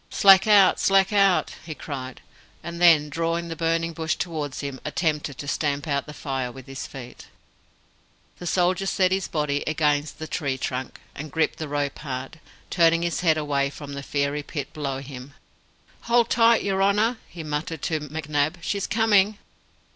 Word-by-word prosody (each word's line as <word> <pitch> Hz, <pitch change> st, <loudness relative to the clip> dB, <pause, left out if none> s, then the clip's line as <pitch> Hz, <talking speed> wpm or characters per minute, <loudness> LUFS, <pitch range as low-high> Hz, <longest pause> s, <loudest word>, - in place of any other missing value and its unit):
"Slack 195 Hz, +1 st, +6 dB
out! 200 Hz, -3 st, +6 dB
slack 195 Hz, +1 st, +3 dB
out!" 195 Hz, -5 st, +3 dB
he 160 Hz, -2 st, -7 dB
cried; 130 Hz, -4 st, -7 dB, 0.4 s
and 170 Hz, 0 st, -6 dB
then, 160 Hz, -4 st, +6 dB
drawing 165 Hz, +3 st, -2 dB
the 165 Hz, -, -4 dB
burning 165 Hz, +1 st, 0 dB
bush 160 Hz, -1 st, -1 dB
towards 150 Hz, -5 st, -4 dB
him, 140 Hz, -2 st, -5 dB
attempted 150 Hz, -3 st, -2 dB
to 145 Hz, -, -7 dB
stamp 145 Hz, 0 st, -1 dB
out 140 Hz, -1 st, -1 dB
the -, -, -7 dB
fire 130 Hz, -4 st, -3 dB
with 130 Hz, 0 st, -12 dB
his 135 Hz, -1 st, -7 dB
feet. 125 Hz, -2 st, -10 dB, 1.1 s
The 175 Hz, -, -6 dB
soldier 185 Hz, +2 st, +1 dB
set 185 Hz, -1 st, +2 dB
his 190 Hz, 0 st, 0 dB
body 145 Hz, -2 st, -1 dB
against 150 Hz, -1 st, 0 dB
the 160 Hz, -, -6 dB
tree 140 Hz, -4 st, -2 dB
trunk, 130 Hz, 0 st, -4 dB
and 150 Hz, +1 st, -8 dB
gripped 160 Hz, 0 st, 0 dB
the 155 Hz, -, -4 dB
rope 145 Hz, -1 st, -2 dB
hard, 135 Hz, +2 st, -6 dB, 0.3 s
turning 165 Hz, -1 st, +4 dB
his 170 Hz, -3 st, -1 dB
head 160 Hz, -3 st, +3 dB
away 140 Hz, -2 st, 0 dB
from 145 Hz, 0 st, -9 dB
the 140 Hz, -, -5 dB
fiery 140 Hz, +1 st, -1 dB
pit 145 Hz, 0 st, -6 dB
below 140 Hz, -4 st, -3 dB
him. 135 Hz, 0 st, -10 dB, 0.7 s
"Hold 235 Hz, -1 st, +3 dB
tight, 230 Hz, 0 st, +4 dB
your 195 Hz, -1 st, 0 dB
honour," 210 Hz, +4 st, +2 dB
he 170 Hz, -, -8 dB
muttered 155 Hz, +1 st, -4 dB
to 160 Hz, -2 st, 0 dB
McNab. 150 Hz, +1 st, -2 dB
"She's 200 Hz, +2 st, -2 dB
coming!" 210 Hz, -2 st, +3 dB
155 Hz, 170 wpm, -24 LUFS, 145-175 Hz, 1.1 s, Slack